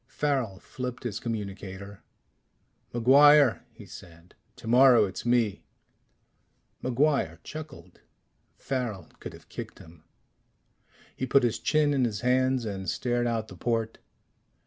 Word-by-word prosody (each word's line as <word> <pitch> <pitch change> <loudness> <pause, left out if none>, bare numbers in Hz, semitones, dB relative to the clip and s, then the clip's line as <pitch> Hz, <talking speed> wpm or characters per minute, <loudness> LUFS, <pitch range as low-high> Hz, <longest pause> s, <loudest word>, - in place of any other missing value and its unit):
Farrel 130 -9 -2
flipped 125 +4 -7
his 110 -4 -4
communicator. 100 -3 -6 0.9
"MacGuire," 140 +2 +5
he - - -14
said. 85 +1 -14 0.2
"Tomorrow 120 0 +5
it's 95 +4 -6
me." 120 -4 +1 1.2
MacGuire 130 - +1
chuckled. 140 - -10 0.6
Farrel 115 -10 -4
could - - -8
have - - -15
kicked - - -8
him. 80 -1 -16 1.1
He 130 - -3
put 135 +1 +4
his 120 -2 0
chin 150 -1 +2
in 135 -2 +1
his 105 -4 -2
hands 130 0 +1
and 95 -4 -4
stared 120 +6 -1
out 115 -2 -2
the 95 - -12
port. 115 +3 -2
120 Hz, 120 wpm, -27 LUFS, 100-130 Hz, 1.2 s, MacGuire